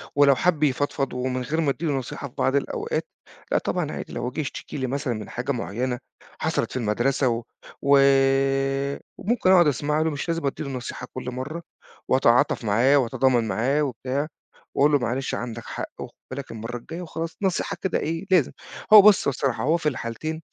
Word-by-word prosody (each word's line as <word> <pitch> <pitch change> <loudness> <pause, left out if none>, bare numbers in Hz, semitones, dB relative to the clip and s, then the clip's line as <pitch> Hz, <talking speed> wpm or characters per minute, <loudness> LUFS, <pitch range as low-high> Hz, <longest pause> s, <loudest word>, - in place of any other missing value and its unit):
ولو 140 -1 +6
حَب 160 0 +1
يفضفض 140 -1 0
ومن 125 0 -2
غير 155 +6 -1
ما 150 - +1
أدّي 150 +5 -2
له 150 - +1
نصيحة 135 +1 -4
في 125 - -18
بعض 135 - +1
الأوقات، 140 - -1 0.5
لأ - - +4
طبعًا - - -1
عادي، - - -6
لو 125 - -3
جِه 145 - -6
يشتكى 145 - -6
لي 130 -2 -1
مثلًا 140 0 -2
من 110 -2 -6
حاجة 125 +3 -3
معيّنة 125 +1 -2 0.4
حصَلِت - - -1
في - - -3
المدرسة 120 +4 +1
و 115 0 -2 0.4
و 140 0 +5 1.2
وممكن 215 -2 +1
أقعُد 175 -4 +6
أسمَع 150 +2 +1
له، 160 - +2
مش 145 +2 -4
لازم 165 -2 -1
أدّي 140 - -2
له 140 - -5
نصيحة 125 -1 -6
كل 125 -1 -5
مرّة، 140 +7 -5 0.5
وأتعاطف 125 -2 +3
معاه، 120 +7 +4
وأتضامن 125 -2 +2
معاه 135 +8 +1
وبتاع، 135 +2 -2 0.5
وأقول 145 +2 +5
له: 145 - +4
"معلش، 125 +2 -2
عندك 115 -1 -5
حق، - - -5
وخُد - - -7 0.2
بالك 135 0 -6
المرّة 115 +2 -5
الجاية." 165 +8 -8
وخلاص، 165 -1 -5
نصيحة 195 0 -1
كده 190 - 0
إيه 165 +4 -3
لازم، 175 -8 +4 0.4
هو 210 - +13
بُصّ 205 -1 +5
الصراحة، 135 -2 0
هو 155 +5 +3
في 155 -3 0
الحالتين 150 +6 -5
135 Hz, 185 wpm, -24 LUFS, 125-155 Hz, 1.2 s, هو